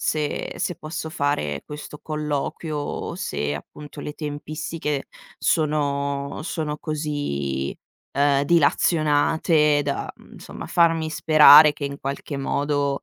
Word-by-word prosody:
se 150 -2 -2
se 180 - -1
posso 160 0 -6
fare 110 - -1
questo 150 0 -8
colloquio, 150 +1 -3
o 145 - -4
se 75 0 -2
appunto 145 - -10
le 150 - -5
tempistiche 150 0 -4 0.3
sono 140 -2 0
sono 155 -3 -3
così, 145 - -3 0.4
ehm, 140 0 +2
dilazionate 150 -1 +3
da, 140 -1 -3
mhmm, - - -20
insomma, - - -9
farmi 165 -2 +2
sperare 155 -1 +8
che 145 - -6
in 140 0 -4
qualche 140 +1 -4
modo, 140 0 -1
150 Hz, 115 wpm, -23 LUFS, 140-155 Hz, 0.4 s, sperare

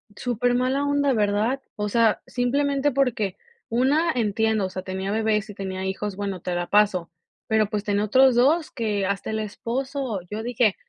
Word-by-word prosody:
Súper 245 +1 0
mala 260 +3 +1
onda, 285 -1 +2
¿verdad? 215 +4 +1
O 210 0 -2
sea, 225 0 +3
simplemente, 280 +3 +1
porque 245 -8 0 0.3
una 285 +8 +2
entiendo, 220 -2 +1
o 185 - -3
sea, 185 - -5
tenía 190 +1 -4
bebés 215 -1 0
y - - -7
tenía 190 -1 -5
hijos, 195 +1 -3
bueno, 200 -2 -4
te 180 0 -3
la 175 0 -2
paso, 200 -5 +2 0.4
pero, 220 -1 +2
pues, 210 -1 -2
tenía 205 0 0
otros 260 +3 +5
2 300 +7 +3
que 210 -5 -1
hasta 200 +2 -2
el 220 - -1
esposo, 235 +1 -3
yo 220 +1 -4
dije, 235 -4 +2
220 Hz, 175 wpm, -24 LUFS, 200-255 Hz, 0.4 s, otros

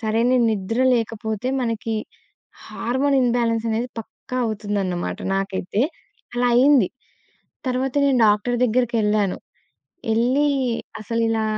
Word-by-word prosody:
సరైనా 230 +3 +2
నిద్ర 220 +3 -1
లేకపోతే 225 0 -2
మనకి 225 -2 -2 0.7
హార్మోన్ 270 +4 0
ఇంబాలెన్స్ 230 -2 +1
అనేది 230 +3 -1
పక్కా 250 +3 -9
అవుతుందన్నమాట 200 -4 -2 0.2
నాకైతే. 195 +2 -1 0.5
అలా 245 0 +2
అయింది. 260 -6 +5 0.8
తరువాత 255 +2 -1
నేను 270 -2 +3
డాక్టర్ 210 +4 +2
దగ్గరికెళ్ళాను. 215 -4 +1 0.8
ఎళ్లి 255 +6 +2 0.5
అసలిలా 225 0 0
230 Hz, 95 wpm, -22 LUFS, 210-245 Hz, 0.8 s, అయింది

